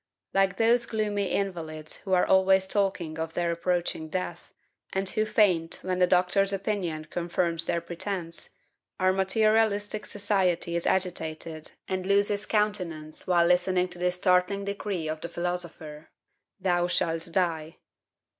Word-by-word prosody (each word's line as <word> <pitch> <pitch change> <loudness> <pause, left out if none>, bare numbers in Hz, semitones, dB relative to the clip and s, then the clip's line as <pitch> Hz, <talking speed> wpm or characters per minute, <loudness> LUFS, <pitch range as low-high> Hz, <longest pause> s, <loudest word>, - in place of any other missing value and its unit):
Like 195 0 +2
those 235 +1 +3
gloomy 210 -2 -1
invalids 160 -6 -3
who 190 - -4
are 180 - +4
always 190 0 +4
talking 190 -5 -1
of 160 0 -4
their 170 -1 0
approaching 170 -2 -1
death, 175 -1 -4 0.4
and 190 0 -1
who 215 +3 0
faint 180 -7 +3
when 185 0 -1
the 180 - +5
doctor's 185 +2 +3
opinion 190 -6 -2
confirms 170 0 -1
their 170 0 0
pretence, 170 0 -4 0.5
our 185 0 +3
materialistic 215 +1 +2
society 190 -4 0
is 170 - -1
agitated 160 -4 -2
and 185 0 -3
loses 200 +1 +2
countenance 180 -8 -1
while 175 -2 +4
listening 180 +1 +2
to 180 0 -9
this 180 0 0
startling 180 +2 +2
decree 200 -4 -3
of 155 0 -4
the 170 - -5
philosopher, 170 -3 -4 0.5
"Thou 175 -2 +1
shalt 165 -1 -1
die!" 165 -3 -1
180 Hz, 135 wpm, -27 LUFS, 170-195 Hz, 0.5 s, the